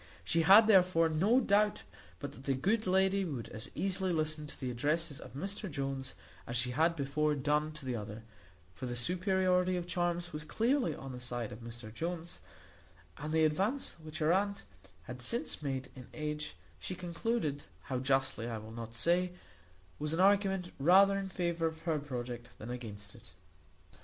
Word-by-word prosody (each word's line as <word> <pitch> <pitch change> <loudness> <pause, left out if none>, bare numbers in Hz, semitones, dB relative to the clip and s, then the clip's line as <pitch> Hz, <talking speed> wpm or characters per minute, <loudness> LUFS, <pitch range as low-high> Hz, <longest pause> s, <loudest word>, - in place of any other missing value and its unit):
She 165 - +2
had, 195 +7 +9
therefore, 180 -5 +5
no 195 +11 +4
doubt 210 -3 +2 0.3
but 145 -1 -6
that 135 -1 -13
the 135 - +1
good 205 - +1
lady 190 +1 +3
would 140 -10 -4
as 110 - -5
easily 190 -1 0
listen 155 -2 0
to - - -3
the 130 -2 -2
addresses 145 +4 0
of - - -11
Mr 195 +6 -4
Jones 135 -2 -3 0.3
as 120 - -1
she 125 +1 +1
had 160 +5 +3
before 150 +1 +1
done 150 +2 +1
to 155 -3 -10
the 125 -2 -1
other; 105 0 -6 0.5
for 130 - -6
the 120 - -3
superiority 185 - +2
of 175 - -3
charms 175 -1 -1
was 150 0 -4
clearly 230 - +1
on 135 0 -7
the 125 - -7
side 120 -2 -3
of 105 - -8
Mr 115 -1 -8
Jones; 170 +3 -4 0.8
and 150 +2 -4
the 160 0 +3
advance 195 - 0
which 155 0 -8
her 160 +2 +3
aunt 200 +1 0 0.4
had - - -7
since 235 -8 -1
made 135 -2 -3
in 125 -2 -10
age, 150 -1 -4 0.2
she 185 - -5
concluded 175 -3 -2 0.2
(how 130 -2 -2
justly 130 -3 +1
I 115 - -3
will 110 +1 -9
not 115 0 -7
say), 175 +7 +2 0.7
was 150 +1 -1
an - - -3
argument 195 -2 +3
rather 190 +7 +6
in 195 -1 -2
favour 170 -3 0
of 160 0 -6
her 160 -3 0
project 120 -4 -5
than 115 +3 -7
against 105 -5 -7
it. - - -15
155 Hz, 180 wpm, -33 LUFS, 130-185 Hz, 0.8 s, had